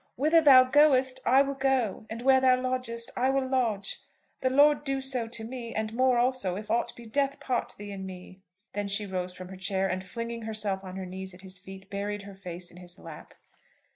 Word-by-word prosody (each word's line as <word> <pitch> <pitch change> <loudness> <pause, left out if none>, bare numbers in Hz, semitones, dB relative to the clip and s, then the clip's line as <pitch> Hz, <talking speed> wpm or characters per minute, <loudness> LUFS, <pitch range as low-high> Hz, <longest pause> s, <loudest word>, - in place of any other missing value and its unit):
'Whither 310 +5 +4
thou 270 -4 +9
goest, 265 -1 +4
I 265 +3 +6
will 275 0 -3
go; 265 -6 0
and 230 +2 -6
where 265 0 +5
thou 255 -1 +5
lodgest, 250 -2 -3
I 255 +2 +2
will 270 -1 +1
lodge. 230 -7 0 0.4
The 260 - +1
Lord 290 +3 +5
do 275 -2 -1
so 260 -3 -2
to 225 -1 -6
me, 235 0 -6
and 220 0 -2
more 255 +1 +3
also, 245 -7 +1
if 210 +2 -6
aught 235 - +1
but 235 -2 -12
death 280 +1 0
part 250 -2 -2
thee 205 0 -8
and 190 -1 -6
me."' 185 0 -11 0.3
Then 205 0 -2
she 200 +1 0
rose 185 -2 -4
from 185 0 -9
her 190 - -9
chair, 190 0 0
and 185 0 -2
flinging 230 +4 -5
herself 215 -3 -2
on 185 -1 -8
her 190 -1 -5
knees 190 0 -7
at 180 - -14
his 190 -1 -9
feet, 190 +1 -11
buried 205 +1 -3
her 200 0 -10
face 180 -2 -7
in 175 - -15
his 180 -1 -10
lap. - - -11
225 Hz, 220 wpm, -28 LUFS, 190-260 Hz, 0.4 s, thou